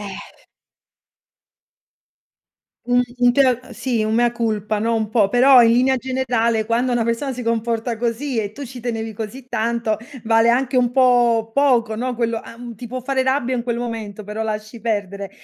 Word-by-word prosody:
Eh. 200 -2 -7 2.7
Un 245 0 +3 0.2
un 245 0 +5
te 275 - +4
l 250 0 -2
sì, 240 -4 -1
un 215 0 -1
mea 240 +1 +2
culpa, 215 -3 -2
no, 230 +1 +1
un 220 -1 -1
po', 215 -3 +2
però 250 +3 +6
in 230 - +5
linea 255 +3 +3
generale 235 -3 0
quando 235 +3 0
una 240 -2 +1
persona 235 +4 -1
si 250 -1 -6
comporta 230 0 -1
così 240 +3 -2
e 205 -2 -4
tu 280 +7 -8
ci 250 0 -9
tenevi 225 -2 -4
così 225 +5 -7
tanto, 230 -2 -1 0.3
vale 225 0 +3
anche 255 +2 +1
un 245 -1 +3
po' 240 -3 +3
poco, 245 -6 +2
no, 245 +2 -3
quello 230 -1 -1
an 235 0 -10
ti 235 +3 -9
può 255 +2 -5
fare 265 +1 0
rabbia 260 -1 0
in 240 - -2
quel 235 -1 -2
momento, 220 -3 -5
però 210 +2 -4
lasci 215 +1 -5
perdere. 200 -3 -3
235 Hz, 180 wpm, -20 LUFS, 220-250 Hz, 2.7 s, però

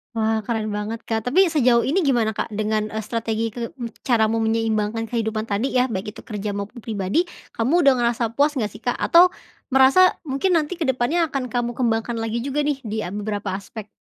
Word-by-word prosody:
Wah, 220 0 +1
keren 215 -1 -2
banget, 215 +2 -4
Kak. 225 -1 -1
Tapi 360 +3 +4
sejauh 245 -5 +4
ini 360 +8 +1
gimana, 240 -7 +2
Kak, - - -3
dengan, 215 0 -1
eee, 220 - -6
strategi 225 -1 -2
ke 235 -1 -4
m 235 -2 -6
cara 230 -4 +3
mau 225 +1 0
menyeimbangkan 225 0 0
kehidupan 220 -2 -2
tadi 215 +5 -1
ya, 250 - +4
baik 210 -2 -5
itu - - -9
kerja 210 -2 -4
maupun 205 +4 -5
pribadi, 220 - -1 0.2
kamu 280 +8 +2
udah 275 - +7
ngerasa 235 -2 0
puas 290 +2 +2
enggak 215 -3 -1
sih, 215 - -12
Kak? 245 - -1
Atau 355 +1 +6 0.4
merasa 270 +8 +5
mungkin 330 +6 +1
nanti 305 +3 -1
kedepannya 290 +5 +1
akan 270 -2 -2
kamu 240 -1 -1
kembangkan 230 -1 0
lagi 225 +1 -2
juga 285 +2 -1
nih 285 -2 -1
di, 220 -3 -4
eee, 180 - -6
beberapa 205 -2 -3
aspek. 205 +2 -7
230 Hz, 200 wpm, -22 LUFS, 215-265 Hz, 0.4 s, udah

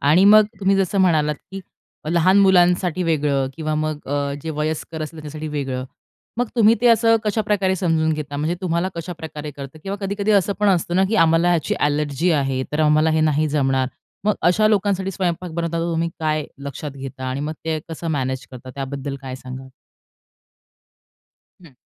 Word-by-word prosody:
आणि 160 +7 +4
मग, 215 +1 +8 0.2
तुम्ही 195 0 +3
जसं 195 0 0
म्हणालात, 155 -5 +3 0.2
की 195 - -5 0.5
लहान 185 +3 +4
मुलांसाठी 180 -2 +3
वेगळं 145 -5 +1
किंवा 155 -1 -2
मग, 155 0 -1
अ, 140 0 -1
जे 160 - -4
वयस्कर 155 +1 -3
असलं 155 +1 -7
त्यासाठी 155 +1 -6
वेगळं. 135 -4 -3 0.5
मग 245 +1 0
तुम्ही 225 0 +6
ते 245 - +3
असं 230 0 +5
कशाप्रकारे 210 -3 +1
समजून 160 -3 +1
घेता? 150 -2 -4
म्हणजे 155 +4 -1
तुम्हाला 175 0 0
कशाप्रकारे 160 -3 -6
करतं 140 +2 -9
किंवा 195 +2 -4
कधी-कधी 200 +1 -1
असं 200 0 +3
पण 210 - +4
असतं 175 -1 +1
ना, 190 - +4
की 220 - -1
आम्हाला 165 +2 +3
ह्याची 170 -3 +1
एलर्जी 150 +3 0
आहे 135 -4 0
तर, 150 - 0
आम्हाला 155 +1 +4
हे 160 0 +2
नाही 155 0 +2
जमणार. 135 -3 +1 0.4
मग, 210 - +3
अशा 195 +6 +4
लोकांसाठी 195 -2 +1
स्वयंपाक 180 -1 -2
बनवतात 170 0 -2
तर, 170 +1 -1
तुम्ही 165 +1 0
काय 155 -1 0 0.2
लक्षात 140 +2 -5
घेता 135 -1 -8
आणि 130 +2 -3
मग, 150 +2 -3
ते 160 -1 -1
कसं 165 +1 -5
मॅनेज 130 -3 -2
करता 130 0 -10
त्याबद्दल 140 0 -4
काय 130 -1 -6
सांगाल? 130 +1 -9 2.0
हं. 160 - -15
160 Hz, 175 wpm, -21 LUFS, 145-185 Hz, 2.0 s, मग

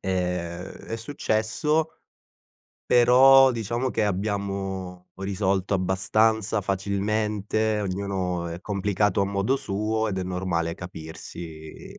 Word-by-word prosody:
Ehm, 90 -2 -2
è 110 +4 -7
successo, 145 +6 -1 0.9
però 130 +2 +7
diciamo 120 +3 -2
che 110 - 0
abbiamo 95 -2 -3
risolto 95 0 -1
abbastanza 105 +3 +1
facilmente, 105 +2 0
ognuno 95 -2 -2
è 85 0 -5
complicato 100 -1 0
a 100 - +2
modo 100 +6 0
suo, 110 -2 -1
ed 95 - -3
è 95 - -1
normale 90 -2 -1
capirsi 80 -2 -9
100 Hz, 100 wpm, -25 LUFS, 95-110 Hz, 0.9 s, però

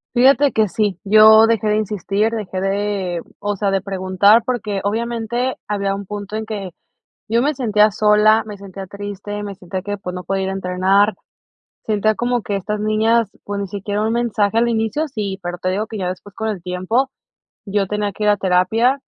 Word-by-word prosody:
Fíjate 275 +3 +5
que 220 -1 +2
sí, 200 -2 -1
yo 220 +2 +7
dejé 220 -2 +1
de 210 - +2
insistir, 210 0 0
dejé 190 -5 -4
de, 195 -3 -1 0.2
o 205 0 -2
sea, 200 0 0
de 195 -1 +1
preguntar, 195 +3 +3
porque 220 -5 -2
obviamente, 235 +4 -1
había 200 -1 -1
un 200 0 -7
punto 205 +1 -6
en 220 0 -3
que 205 -3 -5 0.6
yo 230 +2 +2
me 295 +3 +1
sentía 215 -5 +3
sola, 210 +1 +4
me 210 -1 -7
sentía 195 -1 -9
triste, 205 +1 -6
me 200 -1 -6
sentía 185 0 -6
que, 205 +1 -4
pues, 180 -2 -6
no 180 -1 -6
podía 195 0 -1
ir - - -2
a - - -2
entrenar. 190 +2 +2 0.7
Sentía 215 0 +1
como 245 +1 0
que 205 - -3
estas 210 +2 -3
niñas, 215 +1 +2
pues, 205 0 -4
ni 200 - -3
siquiera 205 +2 -3
un 220 +1 0
mensaje 225 -3 0
al 235 +1 +3
inicio, 230 +7 0
sí, 205 -8 -4
pero, 175 0 -4
te 185 - -1
digo 200 +4 -1
que 220 -1 -7
ya 180 - -2
después 185 +2 -7
con 220 +1 -4
el 190 -5 -5
tiempo, 185 +9 -1 0.5
yo 200 -1 0
tenía 210 0 -2
que 210 - -4
ir - - +3
a 205 - +4
terapia. 200 +8 +2
205 Hz, 200 wpm, -19 LUFS, 195-220 Hz, 0.7 s, yo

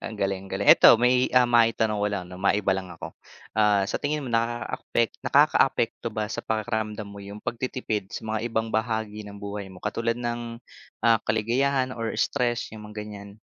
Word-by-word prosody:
ang 110 - -6
galing-galing. 95 -1 -2
'Eto, - - +9
may, 125 +1 +3
ah, 125 -1 +7
maitanong 115 -2 +3
ko 105 - +2
lang, 100 -3 -3
'no, 90 +1 -10
maiba 100 0 +2
lang 95 -1 -4
ako, 85 - -8 0.4
ah, 105 -2 +4
sa - - -2
tingin 150 0 -1
mo, - - -5
nakakaapek 115 0 -1
nakakaapekto 115 - +3
ba 105 0 -2
sa 110 - -4
pakiramdam 110 -1 -2
mo 100 0 -10
'yung 100 +1 -9
pagtitipid 115 -5 -3
sa - - -5
mga 110 0 -1
ibang 110 0 -1
bahagi 110 -2 -2
ng 100 0 -9
buhay 100 -1 -6
mo, 95 - -12
katulad 115 +2 -1
ng, 120 -1 -4 0.4
ah, 115 -1 +5
kaligayahan 130 +4 +1
or 115 -2 -3
stress, 120 +1 0
'yung 105 -1 -9
mga 105 - -13
ganyan? 100 0 -10
110 Hz, 175 wpm, -25 LUFS, 105-120 Hz, 0.4 s, Eto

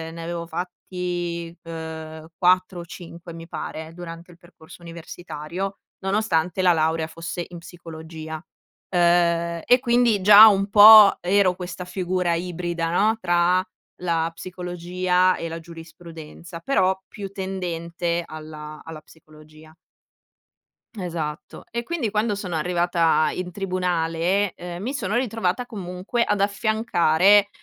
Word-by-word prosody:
ne 165 - -7
avevo 170 0 -5
fatti, 175 -1 -5
uhm, 160 -1 -8
4 185 0 +2
o - - -10
5 170 0 -11
mi 165 0 -10
pare, 160 -1 -7
durante 170 0 -10
il 170 - -17
percorso 170 -1 -16
universitario, 170 +2 -7 0.2
nonostante 190 -3 0
la 180 -1 +5
laurea 160 0 0
fosse 165 +1 -6
in 175 -1 -9
psicologia. 160 -2 -9 0.5
Uhm, 170 -1 +2
e 245 +1 +5
quindi, 235 -4 +2
già 210 +2 +10
un 200 -1 +2
po' 210 0 +9
ero 185 0 +2
questa 180 0 -7
figura 180 -2 -1
ibrida, 175 -1 -3
no, 215 +5 +2
tra 175 -1 +2 0.4
la 165 -2 0
psicologia, 180 +1 -1
e 165 - -5
la 165 +1 -6
giurisprudenza, 165 0 -11
però 190 -8 +1
più 200 -2 -8
tendente 175 -3 -3
alla 155 -1 -9
alla 160 -1 -9
psicologia. 155 0 -18 1.2
Esatto, 165 -6 -5
e 235 +1 -2
quindi 250 -5 -3
quando 210 0 0
sono 185 -4 -5
arrivata 170 -1 +1
in 180 0 -5
tribunale, 180 0 -1
uhm, 175 0 -7
mi 260 +5 -3
sono 210 -5 -2
ritrovata, 225 -2 -1
comunque, 195 +2 -3
ad 205 -1 0
affiancare, 200 -2 +3
175 Hz, 125 wpm, -23 LUFS, 165-190 Hz, 1.2 s, già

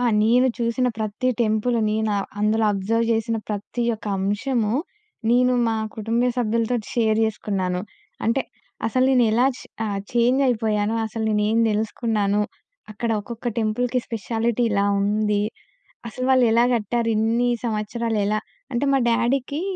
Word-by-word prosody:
ఆ! - - 0 0.2
నేను 245 +4 +4
చూసిన 235 +2 0
ప్రతి 220 +4 -1
టెంపులుని, 220 0 +1
నావ్ 200 -2 -1
అందులో 215 +1 +2
అబ్జర్వ్ 225 +4 0
జేసిన 225 0 0
ప్రతి 210 +3 -3
యొక్క 220 -1 -5
అంశమూ, 210 +3 0 0.6
నేను 250 +1 +4
మా 225 -1 0 0.2
కుటుంబ 225 +2 0
సభ్యులతోటి 230 -1 0
షేర్ 220 -2 +2
జేసుకున్నాను. 195 -4 -2 0.4
అంటే 230 +4 +2 0.4
అసలు 255 +3 +2
నేనేలా 240 -1 +4
చ్ - - -12 0.3
ఆహ్, 200 -1 -2
ఛేంజ్ 240 +3 +3
అయిపోయానో, 215 -2 0
అసలు 220 0 -4 0.2
నేనేమి 220 +2 +2
దెలుసుకున్నాను. 210 -1 0 0.5
అక్కడ 230 +2 -3
ఒక్కొక్క 235 +3 -5
టెంపుల్‌కి 240 +3 0
స్పెషాలిటీ 230 +2 -1
ఇలా 200 -1 +2 0.2
ఉంది. 210 0 +1 0.7
అసలు 255 +3 -4
వాళ్ళెలా 240 -3 +4
గట్టారు, 235 +1 -1
ఇన్ని 230 +3 +2 0.2
సంవత్సరాలు 225 0 -1
ఎలా? 215 +1 0 0.3
అంటే 240 +4 +1
మా 270 - +3
డ్యాడీకి 255 +6 0
225 Hz, 130 wpm, -23 LUFS, 210-240 Hz, 0.7 s, నేను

